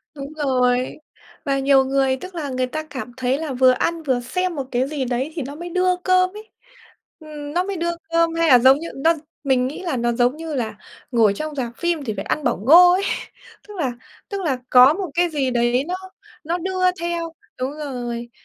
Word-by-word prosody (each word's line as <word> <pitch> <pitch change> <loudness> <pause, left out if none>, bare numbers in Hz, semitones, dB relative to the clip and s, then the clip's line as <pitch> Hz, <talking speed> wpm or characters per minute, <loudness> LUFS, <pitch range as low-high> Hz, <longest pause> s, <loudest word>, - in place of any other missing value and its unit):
Đúng 280 +1 -7
rồi. 255 -4 +1 0.5
Và 275 -1 +1
nhiều 270 -1 +4
người, 270 0 +1
tức 370 +6 -10
là, 305 -4 -4
người 255 -1 -1
ta 310 +4 -4
cảm 275 -5 -7
thấy 260 +1 0
là 310 -4 -4
vừa 255 0 +5
ăn 330 +6 -1
vừa 260 -4 +1
xem 365 +8 -2
một 275 -3 -3
cái 255 +2 +1
gì 285 -2 -3
đấy 255 +4 -2
thì 325 - -3
nó 280 +2 -6
mới 345 +3 -7
đưa 365 +1 +2
cơm 370 0 +3
ấy. 435 +1 -12 0.7
Ừm, 300 -2 -8
nó 355 +2 +1
mới 395 0 -4
đưa 340 +1 -1 0.2
cơm, 335 0 +3
hay 330 0 +2
là 250 -2 +8
giống 265 +3 +6
như 335 - -6
nó 320 +5 +3 0.3
mình 260 -3 +2
nghĩ 290 +7 -7
là 335 -8 -2
nó 240 0 +1
giống 245 +3 +2
như 325 -1 -6
là 225 -5 -3 0.3
ngồi 225 -5 +4
trong 305 +7 -5
rạp 245 -4 -3
phim 345 -3 -1
thì 225 -5 -3
phải 195 - -5
ăn 305 - -1
bỏng - - 0
ngô 350 +6 +8
ấy. 375 +2 +1 0.6
Tức 420 - -10
là 275 -7 0 0.4
tức 400 -1 -3
là 290 -8 0
có 255 +3 +8
một 375 0 -4
cái 350 +2 +2
gì 280 -5 -1
đấy 240 +1 +2
nó 360 - -2 0.5
nó 335 +3 -1
đưa 370 +1 -3 0.2
theo 340 -1 -3 0.3
đúng 255 +2 -2
rồi. 245 -5 -5
285 Hz, 220 wpm, -21 LUFS, 255-335 Hz, 0.7 s, là